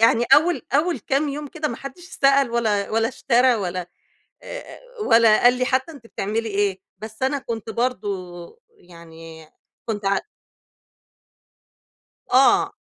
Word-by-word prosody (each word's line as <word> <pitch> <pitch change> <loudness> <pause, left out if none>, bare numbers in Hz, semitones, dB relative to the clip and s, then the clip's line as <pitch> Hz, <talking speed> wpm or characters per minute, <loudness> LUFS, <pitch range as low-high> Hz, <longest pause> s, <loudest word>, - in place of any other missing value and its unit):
يعني 230 +1 +4
أول 320 -3 +2
أول 325 +5 +1
كام 285 +1 -1
يوم 295 +1 -5
كده 305 +1 -3
ما 235 - -5
حدّش 275 +6 -10 0.2
سأل 275 -2 +4
ولا 215 -4 0
ولا 225 +1 +1
اشترى 250 0 +2
ولا 180 -4 -4 0.6
آآ - - -9 0.3
ولا 225 -1 +5
قال 245 +1 +7
لي 255 - 0
حتى 265 +5 0
أنتِ 270 -7 -14
بتعملي 220 +3 -3
إيه؟ 200 -2 -1 0.2
بس 220 +2 -10
أنا 275 +2 0
كنت 230 -4 -6
برضه، 200 - -4 0.2
يعني 165 -2 -14 0.4
كنت 210 -2 -4
ع 195 0 +2 2.1
آه. 390 +10 +4
230 Hz, 135 wpm, -22 LUFS, 200-275 Hz, 2.1 s, قال